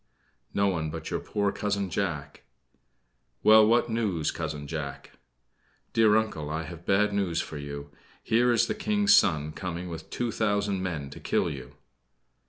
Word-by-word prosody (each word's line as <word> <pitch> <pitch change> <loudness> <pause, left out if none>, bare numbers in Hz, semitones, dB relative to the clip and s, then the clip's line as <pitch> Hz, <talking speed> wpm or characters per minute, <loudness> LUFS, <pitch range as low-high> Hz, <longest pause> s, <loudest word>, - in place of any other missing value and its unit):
"No 100 0 +2
one 80 -5 -1
but 80 0 -6
your - - 0
poor 100 -1 -1
Cousin 100 -2 -2
Jack." 80 -7 -3 1.0
"Well, 110 0 +8
what 120 +2 +3
news, 105 -9 0
Cousin 75 -2 -4
Jack?" 70 -2 -6 0.8
"Dear 110 -2 +5
Uncle, 100 -10 -2
I 80 +1 -2
have 85 0 -10
bad 105 +1 +3
news 95 -5 0
for 75 - -5
you. 70 0 -7 0.3
Here 120 +2 +3
is 115 - +4
the - - -1
King's 205 -1 +2
son 75 - +4
coming 90 +2 -5
with 80 -1 -8
two 120 -1 -2
thousand 100 -3 0
men 80 -7 -4
to - - -9
kill - - 0
you!" 65 -4 -9
95 Hz, 160 wpm, -28 LUFS, 80-110 Hz, 1.0 s, Well